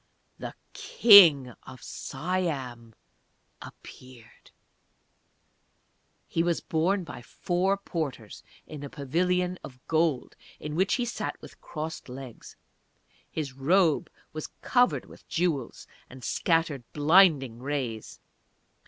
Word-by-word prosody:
The - - -7 0.2
King 200 - +7
of 130 -2 -13
Siam 135 -8 -4 0.7
appeared. 125 -3 -14 1.8
He 165 - -1
was 170 0 0
borne 180 +5 0
by 160 - -9
four 180 +9 -1
porters 150 - -5 0.2
in 150 -2 -9
a 140 - -6
pavilion 180 +6 -1
of 125 -2 -11
gold, 160 -5 0 0.2
in 150 - -6
which 190 +5 +1
he 245 - -1
sat 240 - -5
with - - -14
crossed 155 -3 -7
legs. 130 -2 -10 0.7
His 145 -5 -5
robe 160 +4 +2 0.2
was 155 -1 -5 0.2
covered 250 0 +2
with - - -17
jewels, 165 -8 -2 0.2
and 130 -1 -13
scattered 165 -4 0
blinding 150 -6 +4
rays. 130 -5 -4
155 Hz, 105 wpm, -27 LUFS, 130-180 Hz, 1.8 s, King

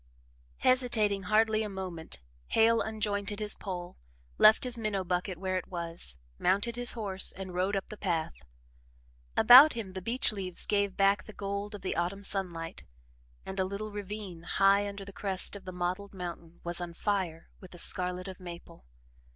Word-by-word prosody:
Hesitating 225 -6 +2
hardly 220 0 +3
a 215 - -2
moment, 180 - -7 0.3
Hale 225 +1 +4
unjointed 210 -1 -2
his 210 -1 +1
pole, 180 -2 -6 0.4
left 215 - +7
his 250 -1 +1
minnow 215 -4 -2
bucket 180 +1 -2
where 185 +1 -1
it - - -11
was, 170 - -5 0.2
mounted 200 +6 +2
his 245 0 +2
horse 200 -5 0
and 190 -1 -8
rode 185 +3 0
up 195 - -2
the 215 - -8
path. 165 - -2 1.0
About 270 +5 +10
him, 215 -6 -6
the 190 - -5
beech 235 +7 +1
leaves 190 -4 0
gave 200 -2 0
back 195 +1 +3
the 215 - -9
gold 200 +1 -4
of 200 - -10
the 190 - -2
autumn 180 +4 -2
sunlight, 175 -5 -4 0.6
and 190 0 -5
a - - +3
little 200 +3 -5
ravine, 205 -3 -6
high 195 +3 +3
under 200 -1 -8
the 200 - -10
crest 195 0 0
of 200 - -10
the 185 - -5
mottled 180 +3 -3
mountain, 170 -2 -8
was 175 +1 -2
on 170 -1 -6
fire 185 -6 -2
with 185 - -12
the 175 - -13
scarlet 180 +1 +1
of 190 -1 -8
maple. 170 - -11
195 Hz, 175 wpm, -30 LUFS, 180-210 Hz, 1.0 s, About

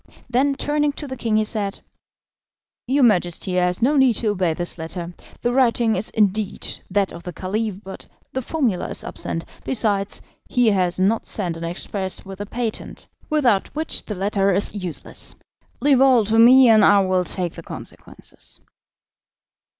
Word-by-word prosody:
Then, 265 +3 +1
turning 295 +1 0
to 290 - -7
the 260 - -5
king, 225 -3 0
he 215 - +3
said: 210 -2 -3 1.1
"Your 270 +2 +3
majesty 180 -4 +2
has 180 +3 +1
no 285 +4 +3
need 260 -4 +4
to 220 - 0
obey 185 -5 0
this 175 0 -4
letter. 170 +2 -5 0.3
The 240 - 0
writing 235 -3 +3
is 195 +3 -2
indeed 210 -1 0 0.2
that 195 0 +1
of 170 - -9
the 180 - -7
Caliph, 205 +3 -3
but 190 - -10 0.3
the 260 - -1
formula 245 - -1
is - - -5
absent. 165 - -5 0.2
Besides, 205 -5 -1 0.3
he 245 -3 +3
has 185 -3 +1
not 205 +4 +1
sent 180 -6 -1
an 165 +1 -6
express 190 +3 -4
with 195 0 -9
the 205 - -5
patent, 230 0 -5 0.2
without 250 -10 +2
which 315 +1 -1
the 210 - -5
letter 195 +1 +1
is 195 +2 +1
useless. 185 -6 -5 0.5
Leave 275 -3 +4
all 255 -5 +5
to 225 +2 +2
me, 255 +2 +8
and 220 -2 +6
I 200 0 +6
will 185 -1 +1
take 180 -1 -2
the - - -9
consequences." - - -9
210 Hz, 165 wpm, -22 LUFS, 185-245 Hz, 1.1 s, me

